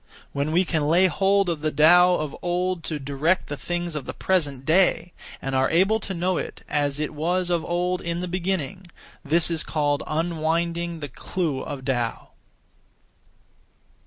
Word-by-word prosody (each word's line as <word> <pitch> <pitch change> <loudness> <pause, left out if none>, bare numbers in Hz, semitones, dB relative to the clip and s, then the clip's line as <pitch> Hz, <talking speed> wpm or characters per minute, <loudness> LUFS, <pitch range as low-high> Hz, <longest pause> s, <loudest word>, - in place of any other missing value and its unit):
When 140 +2 -1
we 180 +3 +3
can 155 -4 0
lay 175 +4 +5
hold 195 +2 +2
of 165 -4 -2
the 155 - +1
Tao 175 +4 +6
of 150 -3 -3
old 180 0 -1
to 155 - -2
direct 145 +6 0
the 145 - -3
things 175 +2 -3
of 150 - -4
the - - -5
present 145 -8 0
day, 175 0 +2 0.3
and 135 - -4
are 130 0 +2
able 195 +6 +3
to 195 -3 -5
know 180 +1 0
it - - -6
as 145 -1 -1
it 155 0 -2
was 175 +4 -1
of 170 -2 +1
old 180 +1 -1
in 170 0 -3
the 180 - -3
beginning, 185 0 -3 0.4
this 165 +3 +2
is 165 -2 +1
called 145 -2 0
(unwinding) 170 +1 -1
the 145 - -4
clue 160 -8 -3
of 135 -3 -6
Tao. 120 -4 -2
170 Hz, 170 wpm, -24 LUFS, 150-180 Hz, 0.4 s, Tao